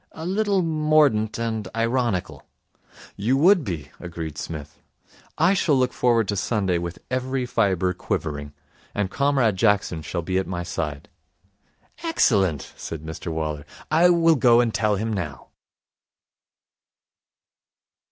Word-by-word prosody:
'A 160 Hz, -, -7 dB
little 200 Hz, 0 st, +1 dB
mordant 155 Hz, -9 st, +2 dB
and 110 Hz, -3 st, -3 dB
ironical.' 115 Hz, -4 st, -1 dB, 0.7 s
'You 120 Hz, +7 st, +1 dB
would 180 Hz, +3 st, +5 dB
be,' 85 Hz, -, -5 dB
agreed 85 Hz, -3 st, -6 dB
Psmith. 75 Hz, -2 st, -7 dB, 0.6 s
'I 170 Hz, +5 st, +4 dB
shall 170 Hz, -6 st, +2 dB
look 125 Hz, -1 st, +1 dB
forward 115 Hz, -4 st, +2 dB
to 100 Hz, -, 0 dB
Sunday 95 Hz, -4 st, 0 dB
with 85 Hz, 0 st, -5 dB
every 130 Hz, 0 st, -1 dB
fibre 95 Hz, -6 st, +1 dB
quivering. 75 Hz, -4 st, -4 dB, 0.4 s
And 100 Hz, -2 st, -1 dB
Comrade 135 Hz, -8 st, +2 dB
Jackson 100 Hz, -5 st, +1 dB
shall 85 Hz, +2 st, -4 dB
be 95 Hz, +2 st, 0 dB
at 95 Hz, -, -3 dB
my 90 Hz, -1 st, -3 dB
side.' 75 Hz, -4 st, -4 dB, 0.9 s
'Excellent,' 100 Hz, -, +1 dB
said 80 Hz, -2 st, -7 dB
Mr 80 Hz, +1 st, -6 dB
Waller. 75 Hz, -2 st, -3 dB, 0.3 s
'I 165 Hz, +3 st, +5 dB
will 165 Hz, -2 st, +4 dB
go 120 Hz, -3 st, +5 dB
and 120 Hz, -2 st, +1 dB
tell 105 Hz, -2 st, +1 dB
him 110 Hz, +3 st, -2 dB
now.' 75 Hz, -9 st, -5 dB
105 Hz, 130 wpm, -23 LUFS, 85-135 Hz, 0.9 s, would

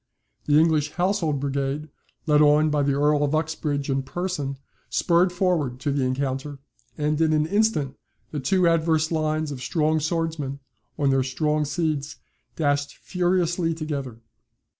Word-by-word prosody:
The 145 Hz, 0 st, +4 dB
English 155 Hz, -2 st, +2 dB
Household 175 Hz, -5 st, 0 dB
Brigade, 140 Hz, +2 st, -2 dB, 0.4 s
led 150 Hz, -2 st, +4 dB
on 150 Hz, +1 st, +5 dB
by 150 Hz, -1 st, +2 dB
the 140 Hz, 0 st, +1 dB
Earl 145 Hz, +1 st, +2 dB
of 145 Hz, +1 st, +1 dB
Uxbridge 155 Hz, -3 st, -1 dB
in 135 Hz, -1 st, 0 dB
person, 145 Hz, -2 st, -3 dB, 0.3 s
spurred 175 Hz, +1 st, +3 dB
forward 175 Hz, -9 st, 0 dB
to 145 Hz, -, 0 dB
the 140 Hz, -1 st, 0 dB
encounter, 135 Hz, +2 st, -2 dB, 0.4 s
and 150 Hz, +1 st, 0 dB
in 160 Hz, -1 st, +3 dB
an 155 Hz, 0 st, +2 dB
instant, 165 Hz, -8 st, +1 dB, 0.4 s
the 150 Hz, -, -3 dB
two 175 Hz, +7 st, +2 dB
adverse 160 Hz, -1 st, +2 dB
lines 155 Hz, -1 st, 0 dB
of 130 Hz, -3 st, -6 dB
strong 155 Hz, +2 st, +1 dB
swordsmen, 160 Hz, -3 st, -2 dB, 0.4 s
on 140 Hz, -2 st, +2 dB
their 135 Hz, 0 st, +3 dB
strong 150 Hz, +3 st, 0 dB
steeds, 150 Hz, -1 st, -2 dB, 0.4 s
dashed 145 Hz, -2 st, 0 dB
furiously 175 Hz, -2 st, 0 dB
together. 140 Hz, -7 st, -5 dB
150 Hz, 145 wpm, -24 LUFS, 140-165 Hz, 0.4 s, on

